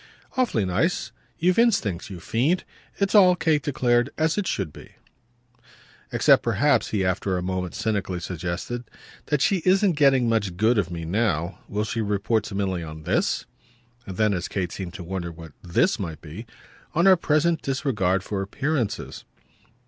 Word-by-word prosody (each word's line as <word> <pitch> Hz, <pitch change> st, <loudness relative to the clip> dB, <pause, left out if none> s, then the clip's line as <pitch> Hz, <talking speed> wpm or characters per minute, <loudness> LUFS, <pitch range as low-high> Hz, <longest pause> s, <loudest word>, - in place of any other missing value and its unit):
"Awfully 235 Hz, -, +1 dB
nice. 110 Hz, -, 0 dB, 0.3 s
You've 180 Hz, +5 st, +2 dB
instincts, 105 Hz, -, +1 dB
you 95 Hz, -3 st, -7 dB
fiend. 140 Hz, -, 0 dB, 0.3 s
It's 200 Hz, -1 st, 0 dB
all," 185 Hz, -4 st, +7 dB
Kate 160 Hz, -3 st, +1 dB
declared, 125 Hz, -2 st, +1 dB
"as 155 Hz, +1 st, +1 dB
it 205 Hz, -3 st, -1 dB
should 90 Hz, -7 st, -2 dB
be." -, -, -13 dB, 1.2 s
"Except -, -, +5 dB
perhaps," -, -, +2 dB
he 100 Hz, -3 st, -1 dB
after 95 Hz, +1 st, 0 dB
a 90 Hz, -, -3 dB
moment 90 Hz, -2 st, -3 dB
cynically 100 Hz, -5 st, -1 dB
suggested, 90 Hz, +8 st, -4 dB, 0.4 s
"that 150 Hz, -2 st, +1 dB
she 195 Hz, -, +3 dB
isn't 185 Hz, +3 st, +3 dB
getting 135 Hz, -4 st, +4 dB
much 100 Hz, -6 st, 0 dB
good 110 Hz, +3 st, +3 dB
of 90 Hz, -4 st, -1 dB
me 85 Hz, -1 st, -5 dB
now. 90 Hz, -2 st, -1 dB
Will 105 Hz, +1 st, -2 dB
she 115 Hz, +1 st, -2 dB
report 105 Hz, +1 st, 0 dB
to 100 Hz, -, -6 dB
Milly 95 Hz, -3 st, -1 dB
on 80 Hz, -1 st, -8 dB
THIS?" -, -, 0 dB, 0.6 s
And 95 Hz, -2 st, -7 dB
then 110 Hz, -2 st, +3 dB
as 90 Hz, -2 st, -2 dB
Kate 90 Hz, -3 st, -3 dB
seemed 95 Hz, -2 st, -6 dB
to 90 Hz, -, -7 dB
wonder 85 Hz, -1 st, -4 dB
what 80 Hz, -1 st, -11 dB
"this" 95 Hz, -, +1 dB
might 85 Hz, -6 st, -5 dB
be: 85 Hz, +9 st, -9 dB, 0.5 s
"On 170 Hz, +3 st, +3 dB
our 190 Hz, -1 st, +8 dB
present 165 Hz, 0 st, +1 dB
disregard 105 Hz, -10 st, 0 dB
for 100 Hz, -1 st, -3 dB
appearances." 135 Hz, +3 st, -2 dB
105 Hz, 165 wpm, -24 LUFS, 90-145 Hz, 1.2 s, our